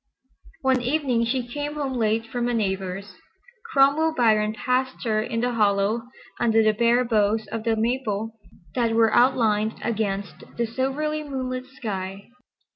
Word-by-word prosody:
One 260 -1 +2
evening 250 -3 +1
she 245 +1 -1
came 290 +4 -4
home 280 -3 -2
late 225 -2 +1
from 245 0 -2
a 240 - 0
neighbor's. 190 -2 -2 0.6
Cromwell 290 +4 +4
Biron 215 -3 +3
passed 255 +3 -1
her 215 -3 +1
in 230 +1 -2
the 245 0 +1
hollow 210 +1 +1 0.3
under 225 -1 +3
the 215 0 +4
bare 235 +3 +3
boughs 215 -1 +1
of 225 0 -4
the 225 -1 +2
maple 225 -2 -1 0.4
that 230 -2 +1
were 225 -1 +4
outlined 225 -4 +3
against 200 -4 -2
the 235 - +1
silvery 270 +6 -2
moonlit 255 -3 -4
sky. 195 -6 -6
230 Hz, 145 wpm, -24 LUFS, 215-255 Hz, 0.6 s, Cromwell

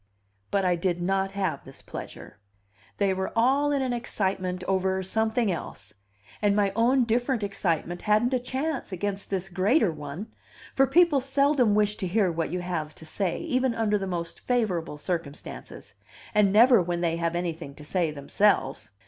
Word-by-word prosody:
But 195 -1 +1
I 180 -1 +3
did 175 0 -1
not 195 +2 0
have 190 -8 -2
this 135 - -12
pleasure. - - -9 0.6
They 200 -2 +2
were 190 0 -3
all 270 +5 +3
in 280 -2 +1
an 255 -2 -1
excitement 190 -6 -2
over 190 0 0
something 220 +2 +1
else, 170 - -6 0.5
and 205 -1 +3
my 200 -2 +2
own 245 +3 +3
different 240 0 0
excitement 175 -3 -1
hadn't 215 +5 +2
a 255 - +2
chance 265 +1 -3
against 200 +2 -4
this 190 -1 -2
greater 195 - +2
one; 155 +8 -7 0.4
for 270 0 +4
people 340 -4 +4
seldom 275 -4 +2
wish 210 0 +2
to 190 - -3
hear 190 0 +2
what 165 -1 -2
you 180 +1 -3
have 165 -4 -4
to 160 - -11
say, 180 +2 -2
even 255 -2 0
under 210 -2 +1
the 195 - -3
most 170 -2 -4
favorable 190 -11 -1
circumstances, 160 -3 -6 0.4
and 210 -2 +4
never 230 +1 +6
when 175 0 -2
they 165 -1 0
have 170 0 -1
anything 165 -5 -4
to 150 - -11
say 175 +1 0
themselves. 140 - 0
195 Hz, 170 wpm, -26 LUFS, 175-230 Hz, 0.6 s, never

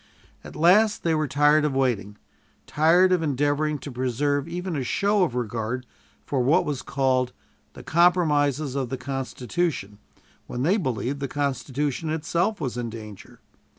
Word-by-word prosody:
At - - -11
last 205 +7 +4
they 165 - +2
were 155 -1 0
tired 150 +2 +4
of 150 -3 0
waiting, 110 -6 -1 0.5
tired 175 +5 +4
of 180 -2 +3
endeavoring 145 +1 0
to 145 - -8
preserve 130 +3 -1
even 180 +1 -4
a 140 - -1
show 200 +10 +1
of 160 -9 +1
regard 120 +1 -3 0.4
for 140 - -1
what 135 +6 +3
was 145 -4 -3
called 130 -2 0 0.4
"the - - -11
compromises 155 -5 +2
of 135 -3 -2
the 130 - -3
Constitution" 135 - -3 0.5
when 125 - -4
they 185 +8 +3
believed 135 - -2
the 140 - -2
Constitution 145 +2 -2
itself 170 +6 -1
was 130 -5 -3
in 120 -1 -3
danger. 105 -3 -11
145 Hz, 150 wpm, -25 LUFS, 125-160 Hz, 0.5 s, last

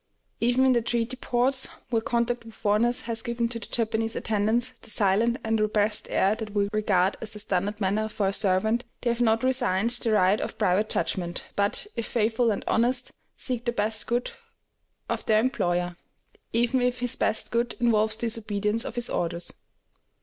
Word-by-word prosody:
Even 245 +3 +3
in 260 - +5
the 240 - +2
treaty 235 +1 -1
ports, 255 +1 +1 0.2
where 225 -2 +2
contact 235 +1 -1
with 225 -1 -13
foreigners 225 +4 +1
has 230 -1 -2
given 235 0 -1
to 230 -1 -4
the 225 - -8
Japanese 225 -1 -1
attendants 225 +3 0
the - - -9
silent 220 +3 +2
and 225 0 0
repressed 210 0 +2
air 195 +2 +2
that 215 -1 -7
we 200 -1 +2
regard 195 -3 +1
as 225 - -1
the 215 - -6
standard 205 0 -1
manner 210 +2 0
for 210 -1 -2
a 195 - +1
servant, 215 +5 +3 0.2
they 240 - +1
have 235 +1 -2
not 225 0 +2
resigned 240 -5 +1
their 240 -2 +3
right 195 +1 +3
of - - -5
private 200 +4 +1
judgment, 175 -2 -2
but, 205 - 0
if 230 - -3
faithful 230 +1 +1
and 205 - -2
honest, 245 +3 +1 0.3
seek 245 -3 -2
the 240 - +1
best 215 -1 0
good 240 +1 -1 0.8
of - - -2
their 215 -1 +4
employer, 180 -8 0 0.6
even 240 +2 +1
if 250 0 0
his 245 +1 +2
best 220 - -1
good 235 +1 0
involves 220 -2 +3
disobedience 220 -1 0
of - - -6
his 240 0 0
orders. 170 0 -2
225 Hz, 180 wpm, -26 LUFS, 210-240 Hz, 0.8 s, in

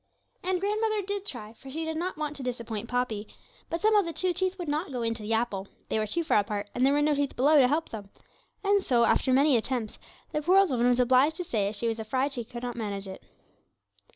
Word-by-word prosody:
And 370 0 0
grandmother 425 +2 0
did 405 +1 -4
try 220 - -5
for 270 +4 -13
she 320 +4 -4
did 320 0 -3
not 345 +1 -3
want 300 -1 -3
to 280 - -5
disappoint 235 -3 -4
Poppy. 240 -4 -1 0.4
But 335 - -2
somehow 430 -1 +5
the 335 -3 -4
two 365 +2 -1
teeth 375 +2 -1
would 350 -3 -5
not 300 +2 -2
go 245 -2 -3
into 230 -1 -1
the 215 +2 -2
apple; 215 -4 -1 0.2
they 220 - 0
were 215 - -1
too 335 +11 0
far 315 - +3
apart, 205 0 -3
and 250 - 0
there 270 - +5
were 295 0 +2
no 300 0 +3
teeth 285 -1 -1
below 290 +4 +5
to 255 - +6
help 310 +5 0
them; 205 -3 -8 0.5
and 400 -1 +3
so, 240 -2 +3
after 260 - +2
many 275 +2 +5
attempts, 230 -1 -3 0.3
the 300 - -1
poor 360 +5 +4
old 390 -5 +5
woman 245 -1 +2
was 245 0 +3
obliged 260 +5 +4
to 360 - -3
say 205 - -1
she 215 +2 -2
was 225 0 -2
afraid 260 +6 -1
she 240 - -2
could 240 +2 -9
not 245 -1 -3
manage 200 -4 -4
it. 190 - -8
260 Hz, 245 wpm, -28 LUFS, 225-325 Hz, 0.5 s, to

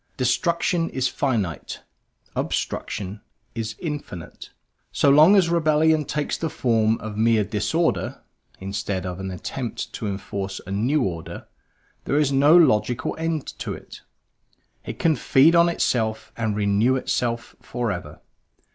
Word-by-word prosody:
Destruction 170 +6 +1
is 130 -1 0
finite, 110 - -2 0.5
obstruction 105 0 -3 0.3
is 115 -1 -4
infinite: 145 - -7 0.4
so 140 - +3
long 155 +8 +7
as 190 -4 +5
rebellion 155 -2 +3
takes 150 +2 -2
the 165 - -1
form 115 -4 +1
of 110 -1 -7
mere 110 -1 +3
disorder 115 - -1 0.4
(instead 95 -1 -3
of 90 0 -5
an 95 0 -4
attempt 115 +6 -5
to 110 - -4
enforce 95 0 -4
a 95 - -7
new 125 +9 +1
order) 85 -5 -5 0.6
there 140 - +1
is 150 -2 +2
no 145 +5 +6
logical 125 -7 +2
end 160 -3 -1
to - - -4
it; - - -12 0.8
it - - -7
can 160 -2 +2
feed 150 +6 +4
on 170 0 +5
itself 110 -9 -1
and 110 -2 -1
renew 105 +5 +2
itself 120 -2 -2
forever. 100 -11 -4
120 Hz, 130 wpm, -23 LUFS, 105-150 Hz, 0.8 s, long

